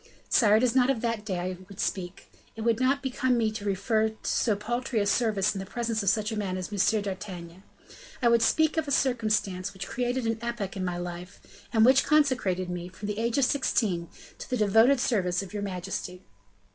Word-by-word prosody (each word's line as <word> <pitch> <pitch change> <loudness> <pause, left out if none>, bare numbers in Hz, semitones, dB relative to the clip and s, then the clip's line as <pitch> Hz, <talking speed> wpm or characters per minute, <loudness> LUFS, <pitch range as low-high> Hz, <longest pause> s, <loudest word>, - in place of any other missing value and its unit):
"Sire, 215 -3 +5
it 220 - +3
is 250 -1 +2
not 255 0 +4
of 255 -5 0
that 230 -3 -2
day 195 -4 -3
I 180 +1 -3
would 200 - -12
speak; 180 -1 -4 0.2
it 225 - -7
would 230 0 +1
not 270 +2 +1
become 260 -1 0
me 220 -2 +1
to 215 -1 -7
refer 215 +3 +1
to 220 - -13
so 220 -4 +1
paltry 240 +3 -2
a 200 - +1
service 210 -1 +1
in 195 - -5
the 190 - -5
presence 230 0 -2
of 200 - +2
such 215 0 0
a - - -3
man 195 -3 -2
as 185 +3 -6
M. 205 +2 +2
d'Artagnan. 185 -3 -7 0.6
I 245 - +2
would 235 -1 +4
speak 315 +7 +2
of 315 -2 0
a - - -3
circumstance 215 -9 0
which 190 -1 -5
created 245 0 -2
an 225 0 -1
epoch 235 -5 -4
in 190 - -3
my 180 -1 -2
life, 175 +1 -9
and 225 -2 +5
which 260 +2 +6
consecrated 255 - +2
me, 180 0 -5
from 205 +3 -7
the 210 +1 -3
age 230 +2 0
of 275 - +4
sixteen, 205 - 0 0.3
to - - -8
the 255 - 0
devoted 225 +5 +4
service 190 -7 0
of 195 - -11
your 205 - -3
majesty." 185 -1 -5
215 Hz, 220 wpm, -27 LUFS, 190-240 Hz, 0.6 s, which